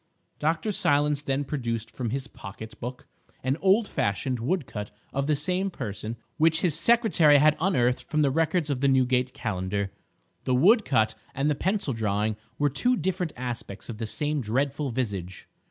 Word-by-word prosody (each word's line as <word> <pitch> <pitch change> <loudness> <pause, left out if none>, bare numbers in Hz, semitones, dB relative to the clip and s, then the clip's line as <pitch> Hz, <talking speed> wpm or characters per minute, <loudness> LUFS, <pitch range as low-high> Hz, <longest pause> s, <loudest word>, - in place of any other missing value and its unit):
Dr. 160 +6 0
Silence 145 -5 +2
then 140 -1 -1
produced 120 -6 -3
from 120 -3 -3
his 135 +3 -3
pocket 110 +2 -10
book 125 +2 -6 0.4
an 130 +2 +1
old 195 +5 +3
fashioned 120 - -1
woodcut 125 - -2 0.2
of 140 +1 -1
the 155 - +3
same 180 +7 -1
person 110 - -5 0.2
which 160 0 +3
his 175 -4 +2
secretary 170 - +5
had 150 +1 +5
unearthed 125 -10 +2
from 155 -1 +2
the 140 - +3
records 160 +1 +1
of 135 -2 -2
the 140 - +3
Newgate 130 -1 +2
Calendar. 100 -2 -2 0.5
The 130 - +2
woodcut 135 - +4 0.2
and 140 +3 +1
the - - +3
pencil 190 -1 -1
drawing 105 -1 0 0.2
were 145 - +2
two 245 - +2
different 180 -1 -1
aspects 120 -5 -5
of 110 -2 -6
the 115 - -3
same 150 +5 -1
dreadful 135 +5 -1
visage. 100 -7 -4
135 Hz, 165 wpm, -27 LUFS, 115-160 Hz, 0.5 s, secretary